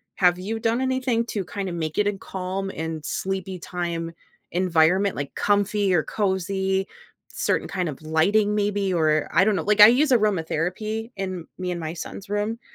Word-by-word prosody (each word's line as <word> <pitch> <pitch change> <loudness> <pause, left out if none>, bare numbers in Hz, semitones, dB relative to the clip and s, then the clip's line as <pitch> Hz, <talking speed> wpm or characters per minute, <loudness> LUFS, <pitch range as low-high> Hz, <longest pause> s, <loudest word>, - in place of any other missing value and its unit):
Have 180 -1 +4
you 220 +4 -3
done 230 +3 0
anything 260 -3 0
to 200 -6 -3
kinda 195 -2 -4
make 160 -2 -3
it 210 - +3
a 205 - -1
calm 190 +1 -4
and 160 -1 -4
sleepy 190 -1 -3
time 170 -1 -4 0.4
environment? 180 +2 +2
Like 140 -1 -5
comfy 205 -1 +1
or 160 - +2
cozy, 190 -1 -1 0.4
certain - - -1
kind 180 -3 -2
of 145 - -8
lighting 200 +7 +2
maybe? 205 -2 0
Or 155 -2 +2
I 185 - +5
don't 215 - +3
know, - - -1
like 210 0 +1
I 210 - +13
use 265 +4 +4
aromatherapy 215 +2 0
in 185 -3 -4
me 180 -1 -3
and 175 - -3
my 160 -1 -4
son's 195 +3 -8
room, 210 +3 -1
190 Hz, 175 wpm, -24 LUFS, 175-210 Hz, 0.4 s, I